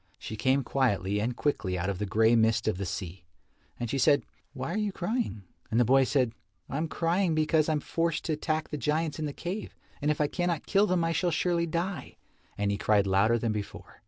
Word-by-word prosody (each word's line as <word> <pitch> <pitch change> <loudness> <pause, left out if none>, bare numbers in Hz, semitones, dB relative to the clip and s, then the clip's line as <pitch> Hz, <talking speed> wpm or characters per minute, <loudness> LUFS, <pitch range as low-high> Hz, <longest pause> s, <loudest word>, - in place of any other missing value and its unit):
She 110 - -7
came 130 +5 +2
quietly 105 -7 0
and 120 +3 -1
quickly 95 -11 -1
out 90 +2 -2
of 100 -2 -2
the 105 - -2
grey 110 +4 +4
mist 110 0 +2
of 105 -4 0
the 100 - -2
sea. 90 -1 -5 0.6
And 120 - -2
she 135 +4 -2
said, 145 +2 +4 0.3
"Why 135 +4 -4
are - - -1
you 210 -1 0
crying?" 190 - -2 0.3
And 115 - +1
the 120 - +5
boy 135 +3 +5
said, 130 -3 +1 0.4
"I 135 - -4
am 160 +2 -1
crying 170 +2 +1
because 155 0 +2
I - - +2
am 150 - -1
forced 165 +1 -1
to 160 - 0
attack 155 +1 -2
the 150 - -3
giants 155 +2 -1
in 155 - -1
the - - -3
cave, 180 +8 -5 0.3
and 145 - +1
if 150 - 0
I 150 - +3
cannot 175 +1 -1
kill 200 +1 +3
them 180 -3 +1
I 165 - +1
shall 175 +2 +1
surely 170 +1 +1
die," 170 -2 -3 0.4
and 100 0 0
he 100 - -2
cried 105 -2 +3
louder 100 +4 +3
than 115 -1 -1
before. 105 -1 -6
140 Hz, 230 wpm, -29 LUFS, 110-165 Hz, 0.6 s, the